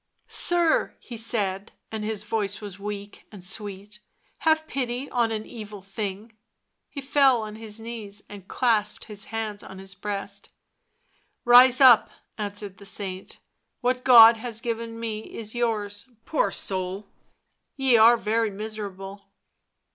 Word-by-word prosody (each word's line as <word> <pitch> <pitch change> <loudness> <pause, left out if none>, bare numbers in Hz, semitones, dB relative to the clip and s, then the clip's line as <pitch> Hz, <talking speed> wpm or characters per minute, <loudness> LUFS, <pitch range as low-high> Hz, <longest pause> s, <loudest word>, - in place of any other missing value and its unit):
" - - -48 0.2
Sir," 345 -2 +2
he 240 - -10
said, 210 -3 -2 0.2
and 220 -1 -4
his 215 -1 -3
voice 210 -2 -2
was 200 -2 -9
weak 205 0 -7
and 200 -4 -11
sweet, 205 +2 -6 0.2
" - - -41
have 315 0 +4
pity 255 -2 -3
on 235 -2 +1
an 215 -1 -3
evil 210 -4 -9
thing." 205 +2 -6 0.5
He 280 - -7
fell 270 -3 +3
on 215 0 -7
his 220 0 -6
knees 220 -3 -8
and 200 -2 -11
clasped 215 -4 0
his 205 -3 -8
hands 220 -2 -4
on 190 - -11
his 195 0 -10
breast. 200 +1 -6 0.5
" - - -43
Rise 245 +1 +7
up," 255 -5 +7 0.3
answered 205 -2 -6
the 200 - -13
saint. 190 -2 -7 0.2
" - - -52
What 250 0 0
God 230 -2 +9
has 225 -1 -6
given 230 -1 -4
me 225 -2 -3 0.2
is 220 -1 -8
yours; 220 -2 -2 0.2
poor 295 -10 +1
soul, 190 +1 -4 0.7
ye 265 -3 +3
are 230 +2 +7
very 225 0 0
miserable." 200 -2 -7
215 Hz, 150 wpm, -25 LUFS, 200-235 Hz, 0.7 s, God